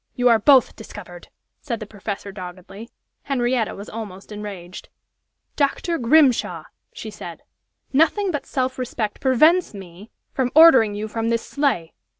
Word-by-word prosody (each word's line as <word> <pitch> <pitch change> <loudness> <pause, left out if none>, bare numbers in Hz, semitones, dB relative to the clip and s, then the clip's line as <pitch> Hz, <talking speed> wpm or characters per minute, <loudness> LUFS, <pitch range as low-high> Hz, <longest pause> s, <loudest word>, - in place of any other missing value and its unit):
You 245 0 +3
are 230 -2 +5
both 265 +2 +4
discovered!" 180 -5 -11 0.3
said 235 -6 -4
the 215 - -6
professor, 205 -1 -7
doggedly. 190 +3 -10 0.4
Henrietta 245 -4 -1
was 200 - -9
almost 210 -3 -9
enraged. 200 -4 -8 0.7
"Dr. 315 +4 -1
Grimshaw," 260 +1 +3 0.3
she - - -8
said, - - -10 0.5
"nothing 330 +7 +2
but 290 -4 -4
self 260 -1 -2
respect 230 -4 -4
prevents 305 - +3
me 190 +2 -12 0.2
from 255 -2 -1
ordering 265 -10 +7
you 210 +1 -4
from 225 +1 -3
this 230 0 -1
sleigh!" 270 - -1
230 Hz, 140 wpm, -22 LUFS, 205-270 Hz, 0.7 s, ordering